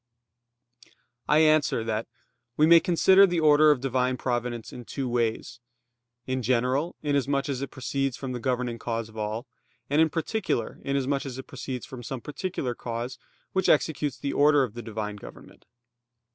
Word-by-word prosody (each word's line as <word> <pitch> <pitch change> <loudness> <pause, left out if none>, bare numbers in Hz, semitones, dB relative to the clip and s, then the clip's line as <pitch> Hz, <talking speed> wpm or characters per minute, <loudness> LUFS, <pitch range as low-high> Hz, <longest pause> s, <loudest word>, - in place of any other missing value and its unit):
I 150 - +5
answer 155 -6 +3
that, 110 0 -2 0.5
We 150 - +5
may 170 +1 +8
consider 190 +3 +5
the 175 -2 0
order 155 0 +6
of 145 -4 +3
Divine 130 -1 0
providence 120 -2 -3
in 125 - -8
two 135 +3 -4
ways: 120 0 -1 0.7
in 130 0 -2
general, 130 +7 0
inasmuch 140 -1 0
as 135 -2 -2
it 140 - -4
proceeds 135 0 -2
from 135 -2 -5
the 125 - -4
governing 125 -1 -2
cause 115 -1 -3
of 110 - -15
all; 110 +3 -3 0.5
and 150 +2 +4
in 160 - +4
particular, 165 - -2
inasmuch 140 0 -1
as 130 -1 -6
it 130 - -7
proceeds 130 -2 -6
from 130 -2 -9
some 130 +2 -5
particular 150 -4 -4
cause 120 +2 -5 0.3
which 190 -1 +1
executes 145 -4 +1
the 140 - -3
order 145 -1 +5
of 120 -5 -4
the 120 - -6
Divine 105 -2 -5
government. - - -13
130 Hz, 165 wpm, -26 LUFS, 120-145 Hz, 0.7 s, may